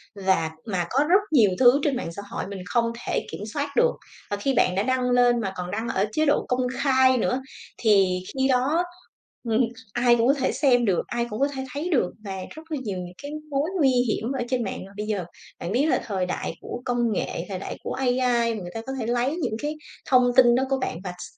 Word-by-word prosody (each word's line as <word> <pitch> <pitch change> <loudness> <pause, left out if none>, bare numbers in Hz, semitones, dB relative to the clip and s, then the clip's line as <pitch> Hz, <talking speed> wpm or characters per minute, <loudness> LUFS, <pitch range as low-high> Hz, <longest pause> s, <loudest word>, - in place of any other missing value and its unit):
Và 190 -5 +1
mà 185 -5 -1
có 275 +3 +3
rất 380 +3 +6
nhiều 220 -9 +6
thứ 255 +2 +6
trên 285 -3 +1
mạng 205 - -4
xã 200 - -5
hội - - -4
mình 200 -1 -6
không 230 +4 +1 0.2
thể - - -1
kiểm - - -6
soát 285 0 -2
được. 485 0 +4 0.4
Và 205 - -1
khi 270 +7 0
bạn 180 -6 +2
đã 195 - +1
đăng 255 0 +1
lên, 245 -1 +4
mà 195 -3 -3
còn 180 0 -4
đăng 220 +3 -3
ở 195 - +1
chế 310 +8 +1
độ 290 - +2
công 250 0 +1 0.2
khai 260 -2 +4
nữa 250 +2 0 0.4
thì 195 -5 +3
khi 265 -1 +1
đó 270 +6 +2 0.7
ừm, 225 +2 +3 0.3
ai 240 0 +4
cũng 235 0 +2
có 275 - +6
thể 270 -2 0
xem 245 -5 +3
được, 190 -4 +2
ai 235 0 -1
cũng 215 - -5
có 280 - +3
thể 265 0 -4
thấy 300 +5 -3
được 255 - +2
và 195 -1 -4 0.2
rất 315 - -10
là 305 - -1
nhiều 200 -5 -3
những 180 0 -6
cái 285 - -6 0.2
mối 285 +3 0
nguy 280 -4 +5
hiểm 245 -1 0
ở 265 -3 -1
trên 250 -2 0
mạng. 195 - -5
Mà 195 - -14
bây 210 - -3
giờ, 200 -5 -1 0.3
bạn 170 - -4
biết 260 +7 +2
là 315 - +2
thời 190 -4 -1
đại 180 - -3
của 245 - -6
công 240 -2 +1
nghệ, 170 - -3
thời 190 -2 -4
đại - - -6
của - - -3
AI, 255 -1 0 0.4
và 215 - -5
người 175 -1 -7
ta 225 - -4
có 265 - -3
thể 225 - -3
lấy 245 +5 +1
những 325 - -2
cái 300 +1 -2 0.3
thông 250 -1 +4
tin 245 -2 +7
đó 260 - +2
của 270 - +2
bạn 165 - -2
và 185 - -4
x - - -6
245 Hz, 250 wpm, -25 LUFS, 200-265 Hz, 0.7 s, tin